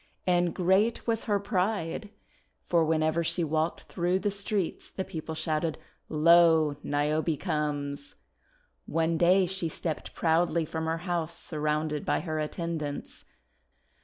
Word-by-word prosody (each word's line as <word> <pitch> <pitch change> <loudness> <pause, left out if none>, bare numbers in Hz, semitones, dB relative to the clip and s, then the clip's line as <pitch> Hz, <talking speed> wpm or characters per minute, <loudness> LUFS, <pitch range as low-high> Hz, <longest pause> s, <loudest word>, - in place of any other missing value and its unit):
And 175 -2 +2
great 190 +6 +2
was 225 -1 0
her 205 -2 +2
pride! 200 -1 -1 0.6
for 170 -2 +3
whenever 160 +1 +1
she 170 +1 0
walked 160 +1 0
through 180 +1 0
the 205 +1 -1
streets 200 -2 -2
the 190 - -4
people 160 0 -6
shouted, 155 0 -1 0.3
"Lo! 160 -1 +5
Niobe 150 +2 0
comes!' 145 -4 -2 0.7
One 165 0 +1
day 185 +2 +5
she 180 -2 -2
stepped 160 0 -4
proudly 165 0 +2
from 160 +1 -3
her 165 +1 0
house 170 -2 -2
surrounded 150 -1 -2
by - - 0
her 155 -3 -3
attendants. 155 -2 -4
165 Hz, 130 wpm, -28 LUFS, 155-180 Hz, 0.7 s, Lo